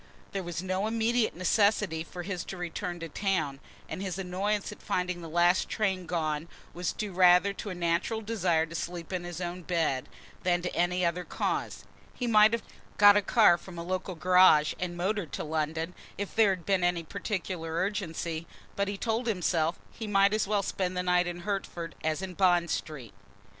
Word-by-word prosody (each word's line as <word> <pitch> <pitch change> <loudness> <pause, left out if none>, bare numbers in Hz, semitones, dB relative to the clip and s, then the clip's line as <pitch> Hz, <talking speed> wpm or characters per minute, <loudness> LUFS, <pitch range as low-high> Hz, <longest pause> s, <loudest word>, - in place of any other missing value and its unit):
There 195 - -2
was 175 -1 -5
no 190 +2 -1
immediate 230 +1 +1
necessity 195 -2 +2
for 175 +1 -8
his 180 -1 -4
return 175 -1 -4
to 165 - -5
town 160 -7 -1 0.3
and - - -5
his 190 -2 -3
annoyance 195 +2 -1
at - - -11
finding 180 -1 -2
the 165 - -8
last 175 +3 +3
train 190 -4 -1
gone 160 -2 -1 0.3
was 180 +1 -2
due 210 -3 -5
rather 180 +2 +5
to 205 - -6
a 185 - -4
natural 175 +6 0
desire 185 -7 +1
to 165 - -11
sleep 170 +1 -5
in 180 -1 -2
his 175 -1 -6
own 175 0 -4
bed, 160 -7 -1 0.3
than 175 -1 +1
to 180 - -3
any 180 +1 +1
other 170 +1 0
cause. - - -2 0.3
He 250 - -3
might 215 -2 +6
have 230 -1 -1 0.3
got 205 -1 +8
a 205 - +4
car 200 -5 +5
from 175 0 -11
a 170 - -4
local 185 +1 -3
garage, 180 -3 +5
and 175 -1 -3
motored 185 -3 -1
to - - -3
London, 160 +2 -2 0.2
if 200 0 -4
there 220 -2 +5
had 185 -3 -2
been 195 -2 +2
any 175 -1 +1
particular 180 -2 -4
urgency, 170 -4 -2 0.3
but, 200 0 0
he 200 0 -3
told 230 +3 -1
himself, 175 -5 +1
he 220 - -7
might 200 0 +4
as 215 -2 +1
well 205 -1 +1
spend 185 -1 -2
the 180 - 0
night 180 0 +3
in 175 0 -5
Hertford 180 -4 -4
as 160 +4 -1
in 185 -1 -5
Bond 175 -2 +3
Street. 135 -8 -4
180 Hz, 190 wpm, -29 LUFS, 170-200 Hz, 0.3 s, got